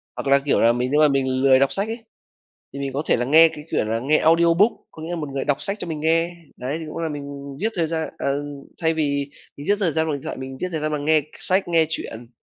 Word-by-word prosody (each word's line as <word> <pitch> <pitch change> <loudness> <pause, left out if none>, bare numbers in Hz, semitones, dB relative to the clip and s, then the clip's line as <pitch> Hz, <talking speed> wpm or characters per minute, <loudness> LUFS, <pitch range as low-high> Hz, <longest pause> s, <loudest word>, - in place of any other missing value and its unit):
Hoặc - - -5
là, 140 0 +5
kiểu, 145 - +2
là 115 +1 +5
mình 125 +2 -1
nếu 150 +1 +4
mà 155 - +7
mình 130 -2 0
lười 130 -1 +6
đọc 135 0 +2
sách 200 +2 -1
ấy, 225 +1 -6 0.7
thì 140 - -6
mình 135 -1 -3
có 140 - -1
thể - - +2
là 120 - -1
nghe 160 +5 +7
cái, 150 - -10
kiểu, - - +1
là 110 +1 -1
nghe 145 +6 +2
audiobook, 170 +6 +4 0.2
có 155 - -10
nghĩa 165 - -6
là 175 - -2
một 155 -4 -4
người 135 -1 -3
đọc 145 -1 +1
sách 200 +1 -2
cho - - -5
mình 160 -2 -4
nghe, 165 +2 +2 0.3
đấy, 130 +5 -3
thì 160 - -6
cũng 155 - -7
là 165 -1 -2
mình 140 -1 -7
giết 220 +2 +1
thời 170 -3 0
gian 160 0 -2
ờ, 140 +1 -1 0.4
thay 160 0 +2
vì 140 -3 -1 0.3
mình 145 - -8
giết 205 - +4
thời 185 -5 +1
gian 160 0 +1
vào 155 - -1
điện 140 - -7
thoại 160 - -5
mình 130 0 -7
giết 185 - -2
thời 160 - -2
gian 155 - -1
bằng 145 -1 -3
nghe 155 0 +4
k - - -15 0.2
sách, 185 0 0
nghe 165 -2 +3
chuyện. 115 -7 -6
150 Hz, 295 wpm, -22 LUFS, 140-165 Hz, 0.7 s, mà